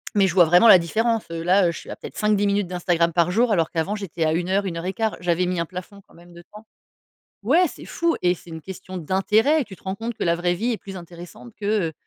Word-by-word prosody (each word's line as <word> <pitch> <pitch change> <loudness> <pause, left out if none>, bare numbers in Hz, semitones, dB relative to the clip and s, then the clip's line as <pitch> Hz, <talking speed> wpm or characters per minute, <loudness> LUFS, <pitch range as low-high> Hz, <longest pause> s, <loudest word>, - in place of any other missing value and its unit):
mais 200 -2 +4
je 180 - -2
vois 180 -1 +6
vraiment 175 +7 +5
la 190 - +9
différence. 225 +7 0
Heu, 165 0 -4
là, 180 0 +3
je 170 - -8
suis - - -13
à - - -5
peut-être - - -10
5-10 210 -1 +2
minutes 200 -1 0
d'Instagram 175 -1 0
par 170 +1 +1
jour, 230 +4 +2
alors 165 -6 +1
qu'avant, 170 +5 -2
j'étais 190 -5 -4
à 155 - +2
1 175 +2 -1
heure, 200 +1 +1
une 175 -3 -4
heure 165 - -5
et 190 - -2
quart. 220 -1 -2
J'avais 175 0 +1
mis 180 -1 -2
un 170 - -1
plafond 185 +3 -9
quand - - -23
même 175 +1 -17
de 170 - -12
temps. 210 +1 -12 0.8
Ouais, 315 - +4
c'est - - -11
fou 335 -1 0
et 180 0 +3
c'est 175 - -15
une 160 0 -7
question 185 +1 -8
d'intérêt. 210 - +2
Tu 195 - -12
te - - -25
rends 190 0 -3
compte 230 +3 -5
que - - -7
la 170 0 +2
vraie 175 +1 0
vie 230 +8 -2
est - - -2
plus 195 +1 -9
intéressante 170 -8 -12
que, 205 -3 0
heu, - - -17
185 Hz, 280 wpm, -23 LUFS, 170-210 Hz, 0.8 s, la